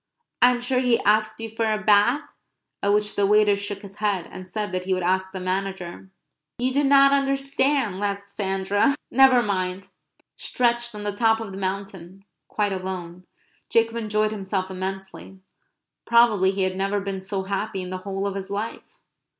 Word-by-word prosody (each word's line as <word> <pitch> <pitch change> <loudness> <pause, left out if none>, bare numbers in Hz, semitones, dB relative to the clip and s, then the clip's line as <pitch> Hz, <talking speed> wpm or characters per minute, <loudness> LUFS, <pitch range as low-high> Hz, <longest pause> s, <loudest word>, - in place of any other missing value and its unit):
"I 245 - +8
am 245 -1 -1
sure 250 +1 +1
he 250 -2 +2
asked 215 +1 +2
you 225 - -4
for 225 0 -1
a 215 - +1
bath?" 210 +8 +3 0.5
at 200 - +2
which 210 0 +1
the 200 -1 +2
waiter 210 0 +4
shook 200 0 -5
his 200 0 -11
head, 200 -5 -1
and 185 0 -9
said 210 +1 -3
that 185 0 -3
he 190 0 +1
would 185 - -3
ask 190 +1 0
the 190 - -6
manager. 190 0 -4 0.5
"You 255 +2 0
do 285 +2 +2
not 275 0 +6
understand," 275 -5 +1
laughed 200 0 -2
Sandra. 200 +4 0 0.2
"Never 260 -1 +6
mind." 190 -2 -2 0.5
Stretched 240 -1 0
on 210 - -6
the 205 - -1
top 225 0 +3
of 220 -3 -6
the 190 - -7
mountain, 195 -1 -5 0.2
quite 205 -2 -1
alone, 185 -1 -6 0.4
Jacob 230 0 +2
enjoyed 215 -1 0
himself 190 -2 -3
immensely. 190 0 -6 0.7
Probably 230 -5 +4
he 195 0 0
had 185 0 -1
never 195 +2 0
been 195 -1 -4
so 190 0 -3
happy 195 0 -3
in 180 - -7
the 185 - -4
whole 195 +1 -4
of 200 - -2
his 195 0 -6
life. 210 +3 -5
200 Hz, 180 wpm, -24 LUFS, 190-225 Hz, 0.7 s, I